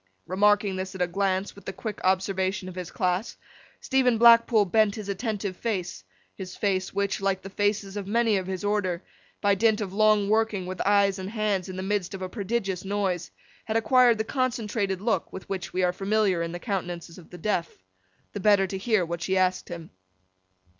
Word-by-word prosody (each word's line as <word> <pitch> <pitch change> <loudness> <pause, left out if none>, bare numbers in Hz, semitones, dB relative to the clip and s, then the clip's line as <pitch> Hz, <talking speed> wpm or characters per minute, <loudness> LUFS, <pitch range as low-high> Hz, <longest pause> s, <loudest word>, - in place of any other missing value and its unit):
Remarking 205 +1 +2
this 190 +1 -5
at 185 - -5
a - - +3
glance, 190 +1 -1
with 200 - -15
the - - -3
quick 210 +2 -6
observation 190 0 0
of 185 - -7
his 180 -1 -6
class, 185 +4 -1 0.4
Stephen 255 -3 +2
Blackpool 230 -2 +6
bent 205 +2 +2
his 215 -2 -7
attentive 200 -2 -3
face—his 180 - -6
face, 190 -3 -1
which, 200 0 -1
like 195 -1 0
the 195 - -8
faces 205 0 -1
of 200 -2 -4
many 225 0 +2
of 190 -2 -2
his 190 0 -4
order, 200 -4 0 0.4
by 205 -1 +4
dint 220 +2 +2
of 195 -3 -4
long 215 -1 +4
working 215 -3 +1
with 185 0 -5
eyes 200 -1 +3
and 190 +1 -5
hands 210 -4 -1
in 185 - -6
the 185 - -4
midst 195 -1 -1
of 190 - -6
a 185 - -4
prodigious 195 -3 -2
noise, 190 -3 -1 0.4
had 220 0 0
acquired 240 +1 +4
the 220 - 0
concentrated 220 -6 -1
look 225 +1 0
with 190 - -9
which 195 -2 -4
we 185 - 0
are 180 0 +2
familiar 195 -2 +1
in 165 0 -3
the 175 - -4
countenances 175 -4 -4
of 170 - -16
the 180 - -10
deaf—the 95 - -5
better 200 -1 +4
to 190 0 -5
hear 210 -3 +2
what 170 0 -5
she 190 +3 0
asked 185 0 +1
him. 170 -2 -8
195 Hz, 195 wpm, -26 LUFS, 185-210 Hz, 0.4 s, Blackpool